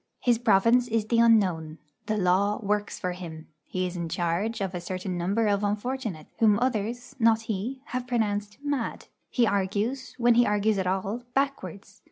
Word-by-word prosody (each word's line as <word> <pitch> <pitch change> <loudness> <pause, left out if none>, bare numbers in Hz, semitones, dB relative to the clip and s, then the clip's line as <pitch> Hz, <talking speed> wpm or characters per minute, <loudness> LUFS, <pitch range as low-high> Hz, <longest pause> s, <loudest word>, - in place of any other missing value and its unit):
His 240 -2 +2
province 235 +3 +4
is 225 -2 0
the 230 +1 +2
unknown; 185 -9 +3 0.3
the 215 - 0
law 195 +2 +2
works 205 0 -1
for 180 - -2
him; 165 -3 -8 0.2
he 185 0 -2
is 180 0 -4
in 170 -2 -3
charge 175 +7 -1
of 195 -2 -2
a 175 - -4
certain 185 +1 -4
number 195 +6 0
of 205 -1 +1
unfortunates, 210 -4 -3
whom 215 -2 +5
others 240 -1 -2
not 225 -1 +4
he 225 +5 -4
have 250 0 -4
pronounced 210 -4 -1
'mad;' 285 -5 -2 0.2
he 245 - +2
argues, 205 +6 -1
when 240 -1 +4
he 240 +1 +4
argues 210 0 +2
at 185 - -1
all, 195 +5 -1
backwards. 205 - -2
210 Hz, 175 wpm, -27 LUFS, 185-235 Hz, 0.3 s, whom